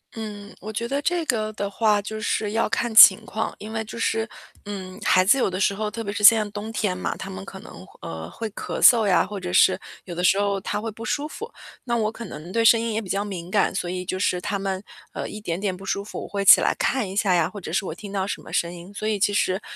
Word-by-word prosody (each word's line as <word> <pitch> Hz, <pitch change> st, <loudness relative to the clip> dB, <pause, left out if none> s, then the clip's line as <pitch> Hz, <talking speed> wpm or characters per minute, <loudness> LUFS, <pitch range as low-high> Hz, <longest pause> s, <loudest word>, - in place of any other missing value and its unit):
嗯， 210 Hz, -2 st, -8 dB
我 215 Hz, -, -6 dB
觉 230 Hz, +2 st, -3 dB
得 280 Hz, +3 st, -1 dB
这 345 Hz, +1 st, 0 dB
个 215 Hz, -6 st, -1 dB
的 200 Hz, -1 st, -3 dB
话， 210 Hz, 0 st, +2 dB
就 215 Hz, +1 st, -6 dB
是 210 Hz, -1 st, -1 dB
要 225 Hz, +1 st, 0 dB
看 230 Hz, +1 st, -1 dB
情 195 Hz, -3 st, +9 dB
况。 220 Hz, +1 st, -3 dB
因 215 Hz, +1 st, -8 dB
为 220 Hz, 0 st, -2 dB
就 220 Hz, +2 st, -9 dB
是 225 Hz, -1 st, 0 dB, 0.4 s
嗯， 190 Hz, -2 st, -7 dB
孩 185 Hz, -1 st, +4 dB
子 225 Hz, +8 st, +5 dB
有 255 Hz, -, +1 dB
的 185 Hz, 0 st, -4 dB
时 200 Hz, 0 st, +2 dB
候 210 Hz, +1 st, -3 dB
特 230 Hz, -, -5 dB
别 200 Hz, -2 st, -4 dB
是 210 Hz, -, -4 dB
现 220 Hz, +1 st, +9 dB
在 210 Hz, -, -4 dB
冬 210 Hz, +2 st, -6 dB
天 205 Hz, -5 st, -1 dB
嘛， 185 Hz, -, -3 dB
他 -, -, -7 dB
们 95 Hz, 0 st, -7 dB
可 -, -, -10 dB
能， -, -, -12 dB, 0.2 s
呃， 80 Hz, 0 st, -7 dB
会 225 Hz, -, -5 dB
咳 -, -, -5 dB
嗽 230 Hz, -3 st, +7 dB
呀， 180 Hz, -4 st, +3 dB
或 205 Hz, +1 st, -7 dB
者 180 Hz, -2 st, -5 dB
是 185 Hz, 0 st, +5 dB, 0.3 s
有 175 Hz, -, -7 dB
的 180 Hz, -, -3 dB
时 190 Hz, +2 st, +4 dB
候 200 Hz, -1 st, 0 dB
他 -, -, -3 dB
会 225 Hz, +2 st, -4 dB
不 225 Hz, +2 st, -10 dB
舒 295 Hz, +4 st, -2 dB
服。 450 Hz, +9 st, -8 dB, 0.3 s
那 240 Hz, -1 st, -1 dB
我 215 Hz, -1 st, +1 dB
可 230 Hz, -, -9 dB
能 170 Hz, 0 st, -9 dB
对 230 Hz, -, +2 dB
声 230 Hz, 0 st, +6 dB
音 230 Hz, -1 st, -2 dB
也 220 Hz, -, -1 dB
比 190 Hz, -, -10 dB
较 200 Hz, +1 st, 0 dB
敏 185 Hz, -3 st, -7 dB
感， 205 Hz, -, +2 dB
所 175 Hz, -, -2 dB
以 180 Hz, 0 st, -4 dB
就 185 Hz, -, -3 dB
是 185 Hz, -2 st, 0 dB
他 200 Hz, +3 st, -2 dB
们， 195 Hz, -1 st, -3 dB, 0.3 s
呃， -, -, -4 dB
一 210 Hz, -, -8 dB
点 175 Hz, -4 st, -3 dB
点 195 Hz, -2 st, -2 dB
不 190 Hz, +1 st, -11 dB
舒 200 Hz, -, -1 dB
服， -, -, -7 dB
我 -, -, -7 dB
会 200 Hz, -1 st, -3 dB
起 -, -, +9 dB
来 -, -, +2 dB
看 245 Hz, -6 st, 0 dB
一 190 Hz, -, -6 dB
下 200 Hz, -3 st, +2 dB
呀， 165 Hz, -2 st, +2 dB
或 205 Hz, -, -9 dB
者 170 Hz, -4 st, -7 dB
是 190 Hz, -, +1 dB
我 160 Hz, -, -4 dB
听 200 Hz, +4 st, -10 dB
到 190 Hz, -1 st, -1 dB
什 200 Hz, -, -4 dB
么 -, -, -13 dB
声 170 Hz, 0 st, 0 dB
音 175 Hz, +3 st, -11 dB
所 210 Hz, -, -6 dB
以 215 Hz, -2 st, 0 dB
其 205 Hz, +1 st, +2 dB
实 190 Hz, 0 st, +1 dB
205 Hz, 305 characters per minute, -23 LUFS, 185-220 Hz, 0.4 s, 情